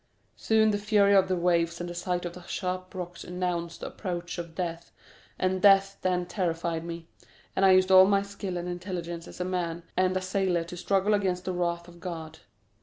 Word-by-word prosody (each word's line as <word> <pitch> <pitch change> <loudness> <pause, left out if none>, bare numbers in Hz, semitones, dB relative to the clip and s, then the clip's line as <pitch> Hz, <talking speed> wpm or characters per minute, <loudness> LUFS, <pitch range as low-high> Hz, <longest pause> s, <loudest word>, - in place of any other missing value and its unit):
Soon 220 -1 +3
the 205 - -1
fury 205 -1 +4
of 190 -1 +5
the 185 - +1
waves 170 -1 +1
and 175 - -4
the 175 - -5
sight 180 0 -2
of 175 - -4
the 180 - -10
sharp 185 0 -4
rocks 175 -1 -6
announced 180 -2 -3
the - - -4
approach 175 -2 -5
of 170 -1 -7
death, 170 -1 -4 0.5
and 185 0 0
death 195 -1 +5
then 180 -1 0
terrified 170 -3 -2
me, 170 0 -6 0.5
and 190 - +1
I 190 -1 +7
used 185 0 +4
all 185 0 +9
my 200 0 +3
skill 200 -2 -5
and 175 0 -4
intelligence 175 -2 -5
as - - -11
a 180 - -1
man 175 -2 -2
and 185 0 +2
a - - -2
sailor 185 -2 0
to 170 +2 -9
struggle 195 +3 +1
against 185 -3 0
the 185 - -2
wrath 170 -1 -1
of 175 0 -14
God. 165 -3 -7
180 Hz, 205 wpm, -28 LUFS, 170-190 Hz, 0.5 s, all